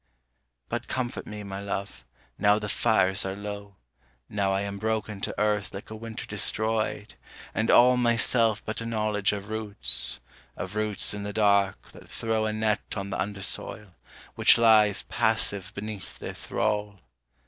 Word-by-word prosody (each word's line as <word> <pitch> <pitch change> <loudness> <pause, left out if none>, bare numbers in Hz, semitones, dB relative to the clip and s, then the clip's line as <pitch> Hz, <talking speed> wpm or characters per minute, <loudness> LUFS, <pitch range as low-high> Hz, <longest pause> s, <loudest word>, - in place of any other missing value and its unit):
But - - -4
comfort 125 -2 -4
me, 105 0 -7
my 100 -1 -6
love, 100 -6 -5 0.4
now 105 0 +4
the 105 -1 -4
fires 95 -3 +2
are 95 0 -4
low, 100 0 -8 0.5
Now 100 -2 -1
I 95 0 0
am 100 0 -5
broken 110 -2 -3
to - - -4
earth 105 -1 -1
like 100 - -9
a - - -6
winter 115 0 -7
destroyed, 110 0 -1 0.4
and 110 - -1
all 125 +1 +6
Myself 115 -2 +1
but 110 +1 -4
a - - -5
knowledge 105 -3 0
of 100 0 -6
roots, 100 - +4 0.4
of 95 +2 -6
roots 105 -2 +1
in 105 - -5
the 100 0 -5
dark 100 -2 +1
that - - -15
throw 110 -1 -2
A - - -1
net 110 -1 0 0.2
on 100 0 -5
the - - -2
undersoil, 100 +1 +3 0.4
which - - +5
lies 110 -3 +4
passive 100 -3 -1
beneath 100 -5 -7
their - - -7
thrall. 105 -2 -3
105 Hz, 160 wpm, -26 LUFS, 100-110 Hz, 0.5 s, all